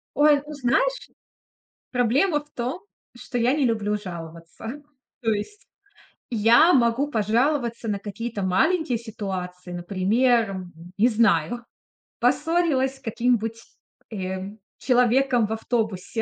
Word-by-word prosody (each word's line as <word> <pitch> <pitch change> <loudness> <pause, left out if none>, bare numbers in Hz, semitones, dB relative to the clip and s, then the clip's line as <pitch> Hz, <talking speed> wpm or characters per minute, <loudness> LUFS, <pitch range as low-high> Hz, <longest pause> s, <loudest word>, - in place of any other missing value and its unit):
Ой, 295 0 +5
ну 300 - -8
знаешь, 400 - 0 0.8
проблема 270 - +2
в 295 - -33
том, 255 +7 -4 0.4
что 245 0 -5
я 240 +2 +3
не 295 -2 +1
люблю 215 -3 0
жаловаться. 170 - -8 0.4
То 225 -3 0
есть 220 - -4 0.6
я 235 +9 +5
могу 250 +2 +2
пожаловаться 235 +1 0
на 205 -1 -1
какие-то 210 +1 -5
маленькие 245 - +1
ситуации. 190 -5 -6
Например, 195 +3 +1 0.3
не 225 +4 +5
знаю, 225 0 +2 0.6
поссорилась 320 -6 +1
с - - -22
каким-нибудь, 230 -2 0 0.5
э, 190 -1 -4 0.3
человеком 250 -1 +3
в 220 - -3
автобусе. 225 -2 -2
235 Hz, 110 wpm, -24 LUFS, 205-265 Hz, 0.8 s, Ой